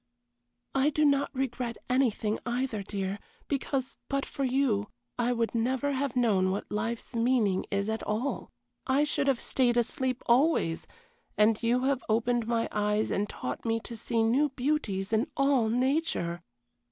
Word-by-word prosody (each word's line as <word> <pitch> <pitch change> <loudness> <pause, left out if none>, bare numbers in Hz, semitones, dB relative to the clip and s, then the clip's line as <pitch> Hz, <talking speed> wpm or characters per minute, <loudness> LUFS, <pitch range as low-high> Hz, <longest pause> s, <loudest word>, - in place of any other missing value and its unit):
I 270 +2 +3
do 305 0 +2
not 280 -1 +3
regret 250 -3 -3
anything 235 -4 +1
either, 245 -3 -2
dear, 195 0 -3 0.3
because, 270 -2 -2
but 275 0 0
for 275 - -4
you, 250 -6 +1 0.3
I 240 +1 +2
would 230 -2 0
never 260 +4 0
have 270 -2 -1
known 205 -7 +3
what 195 +2 -3
life's 225 +3 -3
meaning 230 -5 +2
is 200 0 -1
at 220 0 -2
all 230 +7 -2 0.4
I 275 +2 +3
should 290 -1 0
have 265 -4 +2
stayed 245 -2 +1
asleep 255 +1 -1
always; 240 - +2 0.5
and 215 +1 +4
you 240 +2 +2
have 270 -1 +1
opened 235 +1 +1
my 230 -1 +1
eyes 210 +1 0
and 205 +1 0
taught 125 - -5
me 225 -1 0
to 235 - -7
see 230 0 0
new 265 +7 +3
beauties 245 -8 -1
in 220 +6 +2
all 275 -5 +3
nature. 250 - 0
240 Hz, 155 wpm, -29 LUFS, 215-270 Hz, 0.5 s, and